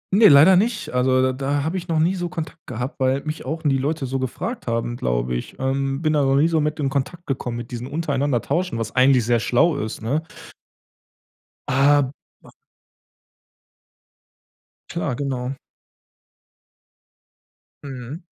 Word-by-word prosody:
Ne, 215 +1 +8
leider 150 +7 +8
nicht. 215 +2 0
Also, 130 +1 +3
da 130 0 +2
da 140 +2 -1
habe 160 +5 -2
ich 180 -1 -6
noch 165 -2 0
nie 165 +4 +3
so 175 -2 -3
Kontakt 165 -2 -7
gehabt, 125 +4 -5
weil 130 +1 +1
mich 155 0 -5
auch 160 +1 -4
nie 135 -3 +2
Leute 145 +1 -1
so 135 +1 -2
gefragt 130 - -4
haben, 115 0 -1
glaube - - -1
ich. - - -5
Ähm, 135 +2 -1
bin 155 -1 +2
da 150 - +3
noch 135 0 +2
nie 145 +4 +4
so 165 -2 +1
mit 150 +1 -2
in 140 -2 0
Kontakt 155 +6 -3
gekommen 125 -3 -3
mit 120 +1 -7
diesem 120 +1 -5
untereinander 145 -4 0
Tauschen, 175 -1 -1
was 115 -1 -4
eigentlich 130 -2 +4
sehr 120 0 +2
schlau 125 - +2
ist, 110 -1 -5
ne? 140 +8 0 1.5
Ah, 140 +2 +4 0.4
b - - -17 2.4
Klar, 160 -7 -2
genau. 130 -1 -3 2.3
Mhm. 135 +3 -8
140 Hz, 155 wpm, -22 LUFS, 125-155 Hz, 2.4 s, Ne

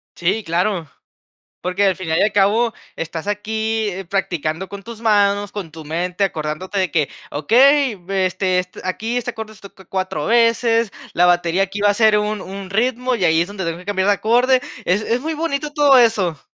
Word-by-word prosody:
Sí, 195 +5 0
claro. 175 0 -1 0.7
Porque 180 +3 -1
al 190 - +2
final 165 -4 -1
y - - +3
al 210 - +3
cabo 215 +4 +3 0.2
estás 165 0 -5
aquí, 220 +1 -1
eh, 195 -1 -6
practicando 175 -2 -2
con 200 -1 -8
tus 230 0 -10
manos, 205 -2 +2
con 190 -6 -6
tu 160 0 -10
mente, 175 +5 -2
acordándote 170 +3 -3
de 185 -5 0
que: 150 -4 +1 0.2
"Okey, 250 - +4
este, 185 -1 +1
est 180 0 -7
aquí 225 +6 -2
este 245 - -2
acorde 220 -1 -8
se - - -19
toca 195 -2 -14
4 185 -6 -3
veces, 230 -1 +3 0.2
la 175 - +4
batería 175 +1 +2
aquí 195 +1 -5
va 205 - +4
a 205 - +3
ser 215 -1 +4
un 210 0 -2
un 195 0 -8
ritmo, 250 +4 0
y 195 -6 0
ahí 160 0 +3
es 170 - -1
donde 200 -2 -5
tengo 165 +1 -3
que 180 - -13
cambiar 195 -1 0
de - - +6
acorde". 245 +5 +3 0.2
Es 185 +4 +2
es 230 +3 0
muy 320 +3 -3
bonito 300 -2 -3
todo 290 -3 +5
eso. 200 - +2
200 Hz, 200 wpm, -19 LUFS, 180-225 Hz, 0.7 s, de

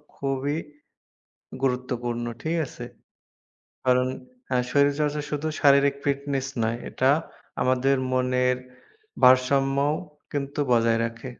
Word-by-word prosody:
খুবই 140 +2 -2 1.1
গুরুত্বপূর্ণ। 125 -2 -1 0.2
ঠিক 165 +2 -1
আছে? 120 - -9 1.0
কারণ 125 0 +3 0.4
হ্যাঁ 125 -1 +1
শরীরচর্চা 145 +1 +2
শুধু 150 +1 -2
শারীরিক 140 -1 +5
ফিটনেস 140 -1 -1 0.2
নয়। 115 +1 0
এটা 130 +1 +2 0.5
আমাদের 130 +2 +2 0.2
মনের 125 0 +2 0.7
ভারসাম্যও 135 +3 +4 0.4
কিন্তু 140 0 -3
বজায় 115 -1 +3
রাখে। 115 +3 -8
হ্যাঁ। - - -19
135 Hz, 100 wpm, -25 LUFS, 125-140 Hz, 1.1 s, শারীরিক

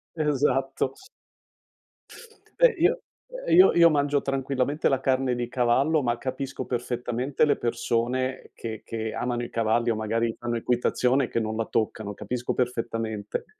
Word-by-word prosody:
Esatto. 135 -3 0 1.6
Beh, - - +7
io 400 +10 +3 0.4
ehm, - - +1
io 370 +2 +8
io 170 -1 +7
mangio 145 -1 +1
tranquillamente 135 +2 0
la 135 - +1
carne 130 -1 +1
di 120 0 -3
cavallo, 130 +6 +2
ma 120 -2 0
capisco 135 +2 -4
perfettamente 125 +3 -1
le 150 - +3
persone 125 +2 -1
che 110 -2 -6
che 110 -1 -4
amano 120 -1 -2
i 120 - -6
cavalli 115 +1 +1
o - - 0
magari 115 +1 -1
fanno 120 0 -2
equitazione 125 +2 +1
che 115 - -1
non 110 -1 -2
la 115 0 -1
toccano, 110 -2 -2
capisco 120 +4 -3
perfettamente. 115 -4 -2
125 Hz, 140 wpm, -26 LUFS, 115-135 Hz, 1.6 s, io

